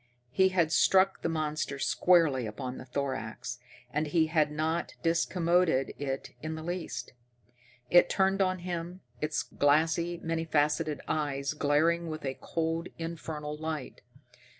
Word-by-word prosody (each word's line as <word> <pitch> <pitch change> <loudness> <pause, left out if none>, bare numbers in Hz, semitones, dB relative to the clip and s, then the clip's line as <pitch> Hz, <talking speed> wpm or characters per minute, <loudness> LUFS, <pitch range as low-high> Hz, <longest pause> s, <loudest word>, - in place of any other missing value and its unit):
He 190 +7 +4
had 175 -4 +2
struck 190 +3 +4
the - - -1
monster 155 -3 -2
squarely 150 -5 +3
upon 125 +4 -5
the - - -9
thorax, 125 -2 -4 0.3
and 150 +2 0
he 160 +2 +3
had 155 -2 +3
not 160 +3 -1
discommoded 170 -3 +2
it 135 -1 -3
in 155 +1 -4
the 160 - -7
least. 175 -5 -4 0.8
It 175 - +7
turned 195 0 +2
on 185 -1 +2
him, 175 +1 -4 0.2
its 155 0 0
glassy, 160 +4 +2
many 165 0 -1
faceted 150 -1 +1
eyes 140 -2 -1
glaring 160 +3 +2
with 155 -1 -5
a 135 - -1
cold, 165 +3 -2
infernal 155 -2 -5
light. 155 -2 -5
160 Hz, 135 wpm, -30 LUFS, 145-170 Hz, 0.8 s, It